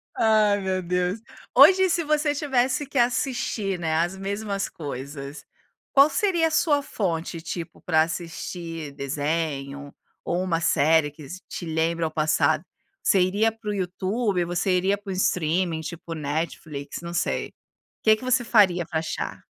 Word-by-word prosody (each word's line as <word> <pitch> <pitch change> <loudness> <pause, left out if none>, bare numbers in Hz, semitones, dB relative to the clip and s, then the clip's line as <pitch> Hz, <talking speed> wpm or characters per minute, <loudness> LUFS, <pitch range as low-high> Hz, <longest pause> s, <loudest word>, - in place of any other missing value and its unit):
Ai 215 -2 +3
meu 190 -1 -1
Deus, 180 +3 -1 0.4
hoje 380 0 +7
se 335 0 +1
você 300 -1 +1
tivesse 270 -1 0
que 275 - -6
assistir, 240 -5 0
não 165 - -3
é, 160 - +1
as 175 +4 0
mesmas 200 0 -3
coisas, 140 0 -7 0.5
qual 280 +2 +6
seria 345 -5 +2
a - - -3
sua 295 -3 +3
fonte, 170 -8 -3
tipo, 170 -1 -6
para 160 -2 +3
assistir 165 -2 -5
desenho, 145 0 -3 0.3
ou 175 +1 -1
uma 170 -3 0
série 155 -1 +3
que 150 -1 -12 0.2
te 175 - -6
lembra 165 +1 0
ao 155 - -2
passado, 155 0 +2 0.4
você 195 - +4
iria 205 +5 +2
para 225 -1 -8
o - - 0
YouTube, 190 +1 -1
ou 170 - -5
você 175 +2 0
iria 195 +3 +1
para 200 -1 -8
um - - -2
streaming 170 -2 0
tipo 165 +1 -7
Netflix, 150 -1 -4
não 170 0 -6
sei, - - -1 0.5
que 220 0 +6
que 215 - -12
você 255 0 +2
faria 190 -7 +4
para 160 -1 -2
achar? 160 - -4
180 Hz, 160 wpm, -25 LUFS, 160-215 Hz, 0.5 s, hoje